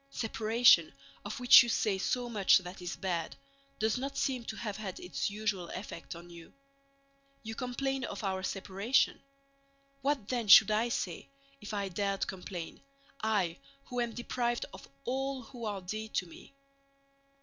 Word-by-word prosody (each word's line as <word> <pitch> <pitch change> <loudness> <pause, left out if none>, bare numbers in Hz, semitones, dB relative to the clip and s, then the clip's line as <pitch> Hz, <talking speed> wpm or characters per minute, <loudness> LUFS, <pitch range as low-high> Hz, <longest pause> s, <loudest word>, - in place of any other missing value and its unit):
Separation, 225 - +4 0.3
of 205 +3 -5
which 245 0 +10
you 240 - -1
say 205 -3 +1
so 245 +5 -1
much 210 -5 +5
that 180 0 -7
is 175 - -4
bad, 170 -4 -3 0.4
does 220 +3 +1
not 275 +1 -4
seem 255 -3 0
to 220 - -5
have 210 -3 -4
had 200 -4 -6
its 180 - -2
usual 200 -4 -2
effect 180 -3 -7
on 170 +1 -11
you. 170 -1 -12 0.9
You 220 0 -5
complain 265 +2 -2
of 200 - -6
our 190 -1 -1
separation. 195 +6 0 0.8
What 275 -6 0
then 240 -4 -1
should 210 - +9
I 220 +3 +2
say, 180 -4 -3 0.3
if 210 - -7
I 200 -2 -2
dared 195 +2 -1
complain, 180 -2 -7 0.4
I 200 -6 0 0.3
who 245 -1 -1
am 235 -1 -2
deprived 240 0 -1
of 190 - -11 0.2
all 265 +1 -2
who 240 -1 -8
are 205 -2 -3
dear 215 +4 -5
to 185 - -2
me? 170 +10 -15
215 Hz, 160 wpm, -32 LUFS, 190-240 Hz, 0.9 s, which